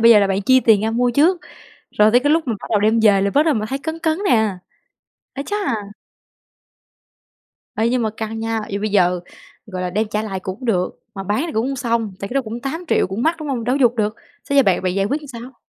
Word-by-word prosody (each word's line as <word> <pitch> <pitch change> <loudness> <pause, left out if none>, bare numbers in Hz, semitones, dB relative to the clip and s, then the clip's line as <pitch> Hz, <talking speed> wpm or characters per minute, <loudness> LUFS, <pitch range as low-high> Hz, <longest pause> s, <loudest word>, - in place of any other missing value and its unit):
bây 230 +1 +7
giờ 220 - +8
là 200 - +3
bạn 195 +1 -1
chi 260 +5 +5
tiền 220 -5 +4
ra 220 - 0
mua 245 +2 +1
trước, 330 +8 +3 0.5
rồi 210 +1 +4
tới 245 - +5
cái 290 +3 +1
lúc 320 -2 +1
mà 235 - 0
bắt - - -7
đầu 210 - +3
đem 220 +2 +3
về 205 -3 +4
là 200 0 +1
bắt 290 - +4
đầu 315 - +3
mình 215 -3 -2
thấy 270 +4 -3
cấn 320 +3 -5
cấn 320 -1 0
nè. 220 - +2 0.8
Ái 275 - -4
chà! 410 - -3 2.2
Ê, 225 +1 +2
nhưng 245 0 +1
mà 220 - 0
căng 220 0 -4
nha, 225 0 -1
vậy 200 - -3
bây 215 +1 -2
giờ, 180 -3 +2 0.5
gọi 185 -4 -5
là, 180 - -2
đem 210 +4 -1
trả 210 0 -1
lại 195 -3 -4
cũng 190 +6 -7
được, 185 -6 -1
mà 195 - -5
bán 205 +7 -1
thì 325 - -6
cũng 225 0 0
hông 275 0 -3
xong, 230 -4 -1
tại 200 - -4
cái 245 - -8
đó 275 - +3
cũng 230 0 -6
8.000.000 320 +6 -1
cũng 195 +5 -4
mắc, 325 +4 +2
đúng 310 -2 -6
hông? 250 -4 -2
Đâu 250 +3 +1
có - - -3
giục 240 -2 +4
được, 215 -1 0 0.3
xế 280 - -1
giờ 275 - +7
bạn 190 -5 +2
bạn 185 -1 -1
giải 195 0 +1
quyết 285 +8 -1
làm 300 - -11
sao? 250 -1 -10
225 Hz, 265 wpm, -20 LUFS, 205-265 Hz, 2.2 s, giờ